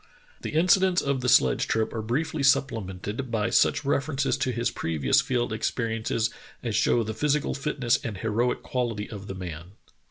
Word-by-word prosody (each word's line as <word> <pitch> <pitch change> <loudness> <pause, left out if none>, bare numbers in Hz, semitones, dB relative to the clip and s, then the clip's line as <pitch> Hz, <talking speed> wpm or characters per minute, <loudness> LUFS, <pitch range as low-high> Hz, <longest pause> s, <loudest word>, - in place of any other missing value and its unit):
The - - -5
incidents 185 +3 +3
of 140 -2 0
the 125 - 0
sledge 65 - +4
trip 110 -1 0
are 110 - -3
briefly 140 +7 -2
supplemented 115 -3 0
by 115 0 0
such 130 - +3
references 140 0 0
to 130 - 0
his 120 0 -1
previous 75 -5 +1
field 120 -3 -1
experiences 115 0 -1 0.3
as 115 -4 -2
show 120 - +3
the 110 0 -4
physical 150 +4 0
fitness 135 -4 0
and 110 -4 -4
heroic 115 +4 -1
quality 115 -5 -2
of 100 -2 -8
the 95 - -6
man. 90 -1 -7
115 Hz, 165 wpm, -26 LUFS, 105-135 Hz, 0.3 s, sledge